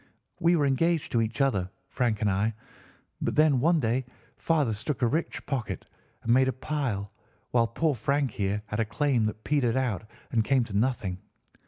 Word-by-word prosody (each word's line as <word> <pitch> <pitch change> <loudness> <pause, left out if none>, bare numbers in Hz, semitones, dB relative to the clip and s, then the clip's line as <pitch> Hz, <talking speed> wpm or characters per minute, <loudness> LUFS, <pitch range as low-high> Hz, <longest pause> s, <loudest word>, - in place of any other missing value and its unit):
We 170 +1 +4
were 150 -3 +2
engaged 160 +3 +1
to 115 - +2
each 115 +4 -1
other, 100 -10 +1 0.2
Frank 120 -5 0
and 105 -2 +2
I; 105 +3 0 0.7
but - - -1
then 150 -4 +5
one 165 +5 +3
day 120 +1 +1 0.3
father 150 -9 +1
struck 125 +6 -3
a - - +5
rich 160 +7 -2
pocket 130 -6 -3 0.4
and 115 - +3
made 130 +1 +5
a - - +2
pile, 130 -8 -3 0.4
while 115 -1 +3
poor 155 +6 +1
Frank 140 +2 0
here 100 +1 -1
had 105 +2 -4
a 110 - +2
claim 120 -1 +1
that 110 0 -6
petered 135 -6 +1
out 110 -5 -1 0.2
and 115 -2 +2
came 130 +2 +3
to 110 -4 -7
nothing. 105 -5 0
120 Hz, 185 wpm, -28 LUFS, 110-145 Hz, 0.7 s, then